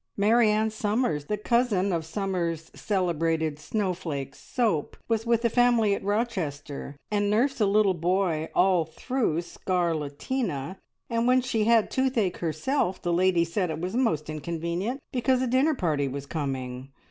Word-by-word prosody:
Marianne 215 +1 +3
Summers, 210 - 0
the 210 - -2
cousin 210 -4 +1
of 165 -1 -1
Summers' 170 -3 -2
Celebrated 165 -5 0
Snowflake 165 -7 -3
Soap, 215 - -1
was 225 0 0
with 235 0 +2
a - - +7
family 235 -3 +3
at 200 - -3
Rochester, 170 - -3 0.2
and 205 -1 +1
nursed 245 +5 +1
a 210 - +4
little 200 -1 +4
boy 175 -2 0
all 180 -2 +4
through 170 - -1
scarlatina, 170 - -2 0.3
and 230 0 0
when 255 +1 +5
she 230 -4 0
had 230 -1 +4
toothache 250 -8 +1
herself 180 - -1
the 175 - -1
lady 175 -1 +3
said 180 +2 -1
it 160 - -3
was 180 +5 -3
most 170 - +1
inconvenient 170 - -3
because 255 0 +2
a 260 - +1
dinner 265 +5 +2
party 155 - 0
was 140 +1 -5
coming. 135 -4 -4
190 Hz, 145 wpm, -27 LUFS, 160-230 Hz, 0.3 s, a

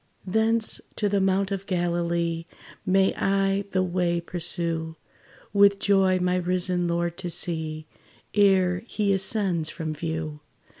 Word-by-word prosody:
Thence 220 +3 +1
to 210 - 0
the 200 -1 +1
mount 195 +1 +1
of 195 0 -4
Galilee 170 -2 -1 0.4
May 190 +1 +3
I 195 0 +1
the 185 -1 +1
way 175 -1 0
pursue, 170 -2 -2 0.6
With 200 -1 +5
joy 195 -2 +3
my 180 0 +1
risen 180 0 0
Lord 170 0 -1
to 180 -2 -4
see, 160 -2 -3 0.5
Ere 190 -3 +3
he 205 -3 0
ascends 190 -4 +1
from 160 -1 -4
view. 155 -1 -4
180 Hz, 130 wpm, -25 LUFS, 170-195 Hz, 0.6 s, With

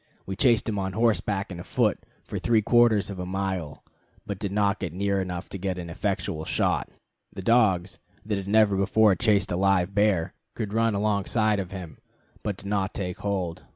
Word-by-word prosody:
We 95 - -4
chased 115 -1 +3
him 105 -3 -1
on 95 -1 -2
horseback 105 -3 0
and 85 -1 -6
afoot - - +1 0.2
for - - -5
three 115 -2 +2
quarters 110 -3 +4
of 95 - -7
a 90 - -3
mile, 95 -5 -3 0.4
but 100 -2 -5
did 100 -2 -3
not 100 0 +1
get 90 -5 -4
near 100 +1 0
enough 90 -1 -5
to 100 - -6
get 95 -1 -2
in 90 - -4
an 85 - -8
effectual 95 -3 -2
shot. - - 0 0.4
The 95 - -8
dogs, 95 -6 +2 0.3
that 105 -2 -1
had 95 - -7
never 105 -1 +4
before 100 +2 +4
chased 105 -2 +2
a - - 0
live 95 0 +2
bear, 100 -5 +2 0.2
could 105 -2 -4
run 115 -1 +2
alongside 105 +1 +1
of 95 -2 -4
him, 90 -5 -8 0.4
but 100 -3 -3
did - - -13
not 100 -1 -1
take 90 -3 -4
hold. 95 -5 -3
100 Hz, 195 wpm, -26 LUFS, 95-105 Hz, 0.4 s, quarters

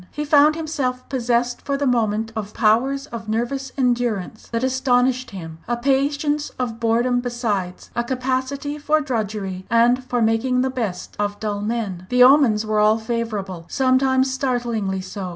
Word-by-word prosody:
He 300 - -4
found 295 +1 +5
himself 280 -6 -3
possessed 245 -1 0
for 280 -1 -2
the 285 - -1
moment 225 -3 +1
of 210 -2 -5
powers 260 +6 +2
of 225 -2 -6
nervous 255 +4 -2
endurance 240 -5 -1
that 230 +1 -1
astonished 255 -1 +1
him 165 -5 -8
a 240 0 0
patience 285 +3 0
of 235 -3 -3
boredom 235 +2 +2
besides, 225 -7 -3
a 235 - 0
capacity 260 +3 -2
for 305 +1 +2
drudgery, 210 -8 -3
and 240 +2 +3
for 250 -1 -2
making 230 +3 +2
the 260 0 0
best 220 -9 -4
of 205 0 -2
dull 205 -2 -3
men. 205 -5 -3
The 250 0 +5
omens 250 -5 +5
were 215 0 +1
all 215 +1 +4
favourable, 220 -6 -4
sometimes 260 0 +2
startlingly 240 -7 -1
so. 185 0 -6
240 Hz, 155 wpm, -21 LUFS, 215-260 Hz, -, found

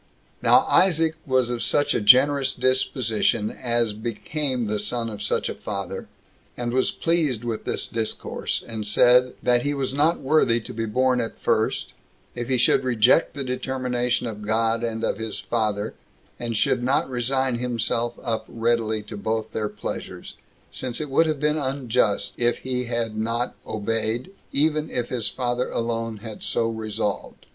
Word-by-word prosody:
4. - - 0
Now - - +9
Isaac 165 -4 +3
was 130 -2 +2
of 120 -1 -2
such 145 +5 +2
a - - 0
generous 135 +5 +5
disposition 120 -4 +1
as 120 -3 0
became 120 +4 -2
the 105 0 -1
son 115 +2 -2
of 105 -1 -7
such - - 0
a - - -3
father, - - -5 0.5
and 120 -1 -2
was 130 0 +2
pleased 155 -9 0
with 115 -2 -3
this - - -1
discourse; 115 -1 -3
and 110 -2 -5
said, 125 +4 +5
"That 120 -1 +3
he 145 +3 -1
was 135 -2 -1
not 155 +4 +2
worthy 135 -4 +3
to 110 - -8
be 115 0 -2
born 125 +2 +2
at 115 - -4
first, - - 0 0.4
if 120 +1 -5
he 130 - +2
should 125 +2 +3
reject 125 +6 +3
the 140 - -3
determination 125 -1 -1
of 110 -3 -5
God 115 +2 +1
and 115 -1 -2
of - - 0
his 110 -1 -3
father, 110 -2 -1 0.5
and 115 -2 -2
should 120 - +2
not 130 +3 +1
resign 130 0 0
himself 120 -1 -1
up 110 -1 -2
readily 115 -2 0
to 105 - -8
both 110 +2 -2
their 105 -1 -2
pleasures; 105 0 -6 0.4
since 125 -2 -3
it 150 -3 -4
would 165 +4 +4
have 155 -2 -1
been 150 +1 +1
unjust 125 -7 0
if 120 0 +2
he 125 -1 -1
had 115 -2 -2
not 115 +3 -1
obeyed, 115 - -2 0.2
even 155 +1 +1
if 120 -1 -2
his 120 -4 -1
father 125 +2 -1
alone 115 -1 -2
had 110 -2 -8
so 115 - +1
resolved." 110 -2 -3
120 Hz, 170 wpm, -24 LUFS, 110-130 Hz, 0.5 s, Now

